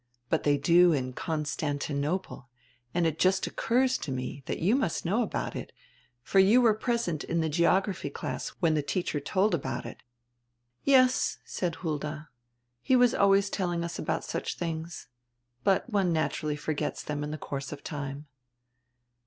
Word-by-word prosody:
But 160 - +1
diey 145 -1 +3
do 175 +3 +5
in 130 -3 -2
Constantinople 145 0 -2 0.4
and 175 +2 +1
it 160 -1 -1
just 190 +1 +3
occurs 255 +2 +1
to 145 - -5
me 130 +2 -4
diat - - -2
you 195 +9 +3
must 260 - -1
know 205 +8 +2
about 220 - -3
it, - - -6 0.5
for 195 - +2
you 200 +6 +6
were 235 -3 +5
present 220 - -1
in 170 - -1
die 160 -1 0
geography 180 +4 +1
class - - -4
when 165 -4 +3
die 155 - +1
teacher 150 +1 -2
told 190 +8 +1
about 160 - -2
it." - - -9 0.8
"Yes," 255 -2 +4
said 175 -3 -2
Hulda, 155 -1 -4 0.5
"he 260 - +3
was 245 -1 +5
always 200 0 +3
telling 175 -3 -1
us 170 - -5
about 160 - -1
such - - -4
tilings. 165 0 -4 0.6
But 195 +3 +2
one 195 -4 +2
naturally 155 -1 -1
forgets 150 0 -3
diem 145 -1 -3
in 150 - -4
die 155 - -4
course 140 -2 -5
of 145 -1 -8
time." 145 -1 -5
170 Hz, 160 wpm, -28 LUFS, 150-195 Hz, 0.8 s, you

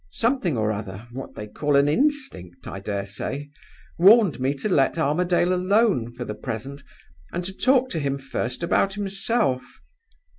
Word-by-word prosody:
Something 230 - 0
or 110 -1 +1
other 105 +1 -6
what 130 +2 -8
they 105 - -6
call 145 +7 -1
an 140 +1 +5
instinct, 155 - -1
I 95 - -6
dare 100 0 -3
say 135 +8 -5 0.5
warned 195 - +6
me 135 +2 0
to 140 - -3
let 150 -6 +2
Armadale 175 +4 +2
alone 185 - +2
for 125 0 -5
the 105 - -4
present, 130 +5 -6 0.5
and 175 0 -3
to 190 - -5
talk 260 +4 +3
to 165 - -1
him 140 -1 -1
first 135 +1 -4
about 195 +3 +1
himself. 200 - 0
145 Hz, 160 wpm, -24 LUFS, 120-195 Hz, 0.5 s, warned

